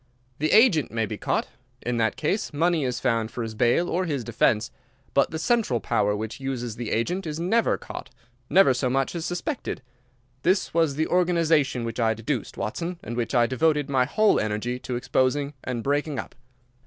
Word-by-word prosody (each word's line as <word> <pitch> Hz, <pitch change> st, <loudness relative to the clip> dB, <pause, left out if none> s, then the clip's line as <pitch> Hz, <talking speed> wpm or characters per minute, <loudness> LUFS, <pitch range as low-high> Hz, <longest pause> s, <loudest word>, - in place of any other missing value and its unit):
The 155 Hz, +2 st, +1 dB
agent 215 Hz, -, +5 dB
may 115 Hz, 0 st, -1 dB
be -, -, -5 dB
caught. -, -, -1 dB, 0.4 s
In 120 Hz, 0 st, -1 dB
that 110 Hz, -1 st, +1 dB
case 205 Hz, -, -1 dB
money 165 Hz, +1 st, +1 dB
is 125 Hz, -1 st, -2 dB
found 115 Hz, -3 st, 0 dB
for 120 Hz, -, -4 dB
his 110 Hz, -1 st, -5 dB
bail 120 Hz, +9 st, +2 dB
or 185 Hz, +2 st, 0 dB
his 145 Hz, -7 st, -2 dB
defence. 115 Hz, +1 st, +1 dB, 0.4 s
But 140 Hz, -, +3 dB
the 160 Hz, -, -4 dB
central 165 Hz, -, +1 dB
power 105 Hz, -1 st, +1 dB
which 110 Hz, +4 st, -5 dB
uses 125 Hz, -4 st, -4 dB
the 115 Hz, -2 st, -5 dB
agent 175 Hz, +11 st, -1 dB
is 155 Hz, +1 st, -4 dB
never 215 Hz, +7 st, +2 dB
caught—never 130 Hz, +6 st, 0 dB
so 125 Hz, 0 st, 0 dB
much 135 Hz, +1 st, 0 dB
as 170 Hz, -1 st, -3 dB
suspected. 175 Hz, -, -4 dB, 0.6 s
This 185 Hz, +5 st, +1 dB
was 165 Hz, -4 st, +2 dB
the 160 Hz, +2 st, +1 dB
organization 165 Hz, -8 st, +2 dB
which 115 Hz, 0 st, -5 dB
I 110 Hz, -1 st, +2 dB
deduced, 115 Hz, +2 st, -3 dB
Watson, 170 Hz, +11 st, -3 dB
and 120 Hz, -, -5 dB
which 120 Hz, +2 st, -2 dB
I 120 Hz, -1 st, +5 dB
devoted 145 Hz, +3 st, +1 dB
my 130 Hz, -2 st, +3 dB
whole 215 Hz, +10 st, +3 dB
energy 110 Hz, +4 st, -2 dB
to 125 Hz, -, -4 dB
exposing 130 Hz, +3 st, 0 dB
and 120 Hz, -3 st, -3 dB
breaking 145 Hz, +1 st, 0 dB
up. -, -, -5 dB
135 Hz, 185 wpm, -25 LUFS, 120-165 Hz, 0.6 s, agent